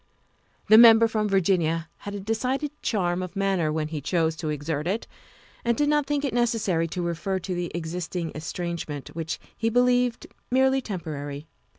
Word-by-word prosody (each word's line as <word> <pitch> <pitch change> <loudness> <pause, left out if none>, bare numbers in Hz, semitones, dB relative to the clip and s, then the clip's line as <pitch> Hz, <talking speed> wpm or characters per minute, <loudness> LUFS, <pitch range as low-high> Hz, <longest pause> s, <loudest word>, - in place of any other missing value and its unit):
The 215 +1 +8
Member 230 -1 +8
from 215 -1 -1
Virginia 170 -4 +1
had 205 0 -7
a - - -4
decided 255 +8 -1
charm 180 -4 0
of 185 +2 -6
manner 195 -5 +1
when 155 0 -2
he 155 -2 -4
chose 160 +1 +1
to 155 -2 -3
exert 150 +1 -2
it, 205 +5 -1 0.6
and 235 -1 +1
did 290 0 +2
not 295 -1 +2
think 290 0 0
it 265 - -2
necessary 225 -8 +1
to 175 +2 -4
refer 170 +3 -2
to 185 0 -4
the 175 -1 -3
existing 170 0 -4
estrangement, 155 -2 -5
which 165 0 -4 0.2
he 225 - 0
believed 245 0 +2 0.2
merely 265 +1 +3
temporary. 150 - -5
185 Hz, 170 wpm, -25 LUFS, 165-230 Hz, 0.6 s, The